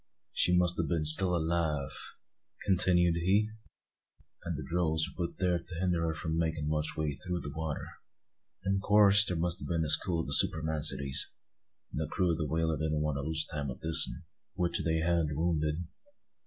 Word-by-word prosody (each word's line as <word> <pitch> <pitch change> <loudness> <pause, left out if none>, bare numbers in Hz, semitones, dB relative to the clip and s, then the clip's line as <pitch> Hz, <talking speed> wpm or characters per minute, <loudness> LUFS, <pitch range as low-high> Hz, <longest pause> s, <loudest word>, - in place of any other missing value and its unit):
"She 90 0 +2
must 90 -1 +3
a' - - +1
been 80 0 -2
still 90 +4 +7
alive," 80 -4 -2 0.7
continued 90 -3 +2
he, 100 +5 +1 0.9
"and 85 -3 -5
the 75 - -6
drogues 80 -2 0
were 85 -2 -2
put - - -19
thear 90 -2 0
to 85 +1 -11
hinder 90 -1 -1
her 80 - -3
from 80 0 -4
makin' 80 -2 -2
much 75 0 -2
way 75 -2 -2
through 90 +5 -5
the 70 - -8
water. 80 -2 -5 0.8
In 95 0 0
coorse 105 0 +6
there 90 - -2
must 85 +1 -1
a' - - -6
been 85 -2 -2
a - - -4
school 85 -3 +3
o' - - -6
the - - -2
spermacetys; 80 -3 +2 0.6
and 75 - -4
the 80 - -3
crew 90 +2 -1
o' - - -1
the 80 -1 -4
whaler 80 0 -1
didn't 80 -1 -2
want 75 -2 -2
to - - -3
lose 80 +2 0
time 70 -1 -5
with 65 - -8
this 80 0 +4
'un, 85 - -11 0.3
which 90 -2 -2
they 80 0 -1
had 85 -1 0
wounded. 80 0 -2
80 Hz, 195 wpm, -29 LUFS, 80-90 Hz, 0.9 s, still